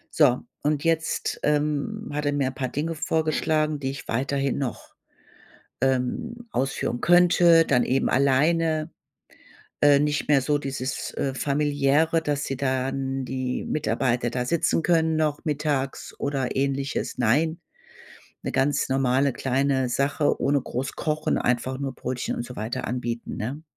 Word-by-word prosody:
So, 130 -5 +4 0.2
und 150 -1 0
jetzt, 165 -1 0
ähm, 150 +8 0
hat 150 0 -2
er 145 - +1
mir 140 -2 +1
ein 130 - -3
paar 130 -1 -3
Dinge 155 +5 -3
vorgeschlagen, 155 -1 0
die 135 -1 -2
ich 140 - -9
weiterhin 135 +2 0
noch, 130 -5 -5 0.9
ähm, 135 - -1
ausführen 125 -2 -2
könnte, 175 -1 +6
dann 125 -3 +3
eben 135 +2 +1
alleine. 155 +4 +2 0.9
Äh, 145 -1 +6
nicht 150 0 0
mehr 140 -3 +4
so 145 +2 +1
dieses, 135 -2 -4
äh, 135 -1 -2
Familiäre, 145 +3 +2
dass 145 -2 -1
die 135 - -3
dann 135 0 -1
die 130 -1 -3
Mitarbeiter 125 -5 0
da 125 0 -1
sitzen 165 +3 +1
können 160 -2 +2
noch 155 -1 -1
mittags 145 -3 -2
oder 135 -3 -2
Ähnliches. 140 0 -1
Nein, 160 +9 +2 0.8
'ne - - -3
ganz 135 +2 +1
normale 135 +1 +2
kleine 130 0 0
Sache 140 +4 0
ohne 140 0 +2
groß 125 +2 -4
Kochen, 155 0 0
einfach 125 +2 0
nur 135 -2 -4
Brötchen 125 0 -3
und 120 - -3
so 125 - -10
weiter 110 +3 -3
anbieten, 120 -1 -4
ne? 135 +8 -4
140 Hz, 145 wpm, -25 LUFS, 130-155 Hz, 0.9 s, könnte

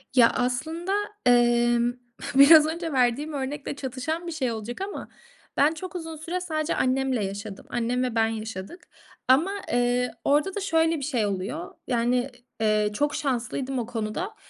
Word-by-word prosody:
Ya 235 -2 +7
aslında, 320 +10 -2 0.3
emm, 240 0 +4 0.4
biraz 300 +3 +9
önce 330 0 -3
verdiğim 260 +4 +1
örnekle 280 +1 -4
çatışan 285 +6 -4
bir - - -3
şey 260 -7 -1
olacak 225 - -6
ama 400 +1 -5 0.5
ben 300 +3 +4
çok 365 +3 -8
uzun 325 -2 -5
süre 340 +4 -4
sadece 310 -3 -2
annemle 260 -4 +1
yaşadım. 200 +1 -7
Annem 245 +1 0
ve 245 -2 -2
ben 225 0 +3
yaşadık 220 - -6 0.4
ama, 300 +10 +4 0.2
eee, 245 +1 +1
orada 300 +8 +2
da - - -1
şöyle 325 -4 +2
bir - - -6
şey 250 -7 0
oluyor. 185 -3 -4
Yani, 245 +1 +1 0.3
eee, 215 -1 +2
çok 290 +7 0
şanslıydım 260 -1 -2
o 230 - -2
konuda. 235 - -4
255 Hz, 155 wpm, -26 LUFS, 235-315 Hz, 0.5 s, biraz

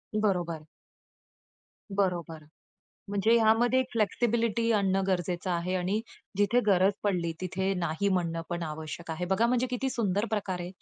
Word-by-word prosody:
बरोबर. 175 -7 0 1.3
बरोबर. 170 -5 -1 0.7
म्हणजे 205 +3 +2
ह्यामध्ये 230 +3 +4
एक 260 - -1
फ्लेक्सिबिलिटी 230 +1 +1
आणणं 195 -2 +2
गरजेचं 180 0 -1
आहे 175 +1 -1
आणि 185 +4 0 0.4
जिथे 205 +5 +4
गरज 195 0 +4
पडली, 175 -5 0
तिथे 190 +1 -1
नाही 175 +2 -1
म्हणणं 170 -3 0
पण 175 0 -2
आवश्यक 160 +2 -6
आहे. 160 +3 -3
बघा 225 +5 +3
म्हणजे 250 +1 +1
किती 255 +2 -1
सुंदर 205 -3 0
प्रकारे 185 -4 -2
190 Hz, 135 wpm, -29 LUFS, 175-215 Hz, 1.3 s, ह्यामध्ये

